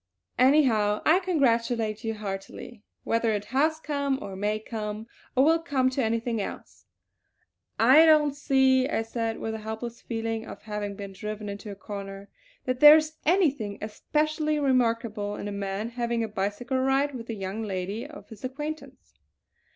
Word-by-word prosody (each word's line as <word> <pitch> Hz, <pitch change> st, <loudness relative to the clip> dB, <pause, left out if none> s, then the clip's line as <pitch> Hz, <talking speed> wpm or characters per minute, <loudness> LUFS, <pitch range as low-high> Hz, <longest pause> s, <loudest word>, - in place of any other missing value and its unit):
Anyhow 245 Hz, -7 st, +4 dB
I 330 Hz, +4 st, +5 dB
congratulate 235 Hz, -, 0 dB
you 225 Hz, -1 st, -2 dB
heartily, 205 Hz, +3 st, -7 dB, 0.2 s
whether 230 Hz, -1 st, +1 dB
it 205 Hz, -1 st, -3 dB
has 315 Hz, +4 st, +2 dB
come, 280 Hz, -3 st, -1 dB
or 195 Hz, -9 st, -7 dB
may 210 Hz, +2 st, -1 dB
come, 215 Hz, -1 st, -5 dB, 0.3 s
or 265 Hz, +2 st, +5 dB
will 325 Hz, +2 st, +4 dB
come 265 Hz, -6 st, +1 dB
to 260 Hz, 0 st, -1 dB
anything 230 Hz, 0 st, -1 dB
else." -, -, -8 dB, 0.9 s
"I 270 Hz, +8 st, +7 dB
don't 300 Hz, -2 st, +5 dB
see," 265 Hz, -2 st, +3 dB
I 225 Hz, -, 0 dB
said, 225 Hz, 0 st, -3 dB
with 220 Hz, -, -4 dB
a 220 Hz, -, -5 dB
helpless 220 Hz, +2 st, -6 dB
feeling 225 Hz, -1 st, -3 dB
of -, -, -10 dB
having 210 Hz, -1 st, -4 dB
been 200 Hz, -1 st, -8 dB
driven 210 Hz, +1 st, -6 dB
into 200 Hz, +1 st, -7 dB
a 200 Hz, -, -6 dB
corner, 195 Hz, 0 st, -8 dB, 0.4 s
"that 255 Hz, -1 st, -1 dB
there 300 Hz, +2 st, +10 dB
is 310 Hz, 0 st, -2 dB
anything 285 Hz, -, +2 dB
especially 305 Hz, +7 st, -1 dB
remarkable 230 Hz, -6 st, 0 dB
in -, -, -6 dB
a -, -, -4 dB
man 200 Hz, +2 st, -3 dB
having 235 Hz, -1 st, -1 dB
a -, -, -2 dB
bicycle 210 Hz, +6 st, -2 dB
ride 270 Hz, +2 st, +1 dB
with 240 Hz, -2 st, -8 dB
a 225 Hz, -, -3 dB
young 195 Hz, +2 st, -4 dB
lady 200 Hz, +2 st, -4 dB
of 300 Hz, 0 st, -12 dB
his 220 Hz, -1 st, -12 dB
acquaintance." 295 Hz, +4 st, -7 dB
230 Hz, 165 wpm, -27 LUFS, 210-275 Hz, 0.9 s, there